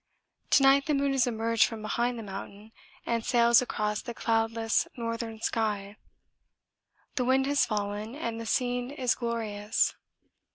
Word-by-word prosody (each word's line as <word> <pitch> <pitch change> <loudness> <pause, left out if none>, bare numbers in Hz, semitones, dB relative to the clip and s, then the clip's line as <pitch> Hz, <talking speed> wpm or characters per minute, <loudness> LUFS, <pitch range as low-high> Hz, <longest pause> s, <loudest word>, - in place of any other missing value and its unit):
To 275 - +5
night 275 +1 +5
the 300 - +2
moon 280 0 +1
has 265 -2 +2
emerged 230 -1 +2
from 225 -2 -6
behind 240 +3 -1
the 225 - -6
mountain 200 +2 -9 0.3
and 230 -1 -1
sails 235 -1 +5
across 210 -3 -2
the 235 - -7
cloudless 225 0 +1
northern 230 -1 -4
sky; 210 -3 -1 1.2
the 250 - +2
wind 265 +2 +3
has 285 +1 +2
fallen 210 +1 -3
and 230 -6 -4
the 230 - -6
scene 245 +1 0
is 260 -4 0
glorious. 220 -3 -1
230 Hz, 150 wpm, -28 LUFS, 220-245 Hz, 1.2 s, To